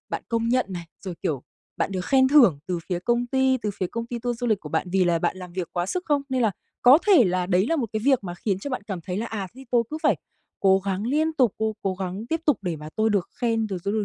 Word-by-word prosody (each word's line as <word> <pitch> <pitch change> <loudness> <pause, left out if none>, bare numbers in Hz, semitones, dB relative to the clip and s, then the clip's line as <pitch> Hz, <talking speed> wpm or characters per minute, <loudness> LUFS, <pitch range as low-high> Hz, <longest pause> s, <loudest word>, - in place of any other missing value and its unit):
bạn - - -3
công 230 0 0
nhận 255 +1 +2
này, 175 -3 -6 0.2
rồi, 185 -2 -4
kiểu, 140 -5 -1 0.3
bạn 195 - -1
được 180 -1 -3
khen 260 -1 +4
thưởng 245 - +6
từ 180 -2 -1
phía 180 -2 -1
công 240 +5 0
ty 265 +1 +2
từ 210 - -1
phía 185 - -2
công 230 +5 -5
ty 240 0 -4
tour 240 0 -3
du 245 - -1
lịch 215 -4 +1
của 150 - -8
bạn 160 +4 -1
vì 190 -1 +3
là 170 -1 +2
bạn 175 +2 -1
làm 180 -2 -9
việc 180 -1 -3
quá 175 0 -1
sức 365 - -3
không? 290 -2 +2
Nên 260 -2 0
là 220 - +3 0.3
có 260 +5 +8
thể 365 - +7
là 180 -1 0
đấy 185 +2 +2
là 330 +5 +1
một 255 - 0
cái 215 - -1
việc 265 -6 +3
mà 175 -1 -5
khiến 190 +1 -2
cho 275 +8 -6
bạn 255 - -3
cảm 195 -4 -4
thấy 180 +2 -5
là 225 +3 -2
"À, 200 -5 -4
thế 265 - -12
tôi 240 -2 +4
cứ 310 - -4
phải - - +3 0.4
cố 190 0 +5
gắng 195 +2 -3
liên 310 +4 +1
tục, 255 -8 +3
cố 220 0 0
cố 190 -1 0
gắng 190 +3 -5
tiếp 325 0 -1
tục 290 -7 +4
để 175 -4 -2
mà 150 +1 -8
tôi 220 0 +2
được 200 -4 0
khen, 225 -2 +1
rồi 195 -3 -4
tôi 200 - 0
được 215 -2 0
215 Hz, 300 wpm, -25 LUFS, 185-245 Hz, 0.4 s, có